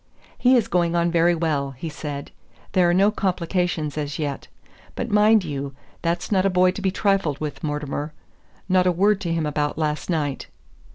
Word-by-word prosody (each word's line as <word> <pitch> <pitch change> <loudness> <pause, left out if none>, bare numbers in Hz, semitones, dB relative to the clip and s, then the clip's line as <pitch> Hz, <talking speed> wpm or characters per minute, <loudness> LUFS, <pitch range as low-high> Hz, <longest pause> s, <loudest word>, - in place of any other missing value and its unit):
"He 255 +1 +4
is 230 - +1
going 175 -1 +1
on 170 0 +2
very 170 +1 +3
well," 150 -4 -1
he 165 - -5
said; 150 -2 -6 0.4
"there 180 -3 +3
are - - +4
no 195 +3 +4
complications 175 -6 -1
as 145 -1 -3
yet. 145 -3 -4 0.5
But 240 -2 -4
mind 210 0 +5
you, 140 -4 -5 0.3
that's 170 +3 -2
not 190 -2 +3
a 195 - +3
boy 185 0 +4
to 195 - -7
be 195 - +1
trifled 190 -7 0
with, 150 -1 -5
Mortimer. 150 0 -3 0.6
Not 185 -1 +3
a - - +4
word 200 +3 +2
to 170 - -2
him 165 -2 0
about 150 0 -1
last 155 +1 -2
night." 145 -5 -1
170 Hz, 185 wpm, -23 LUFS, 150-185 Hz, 0.6 s, mind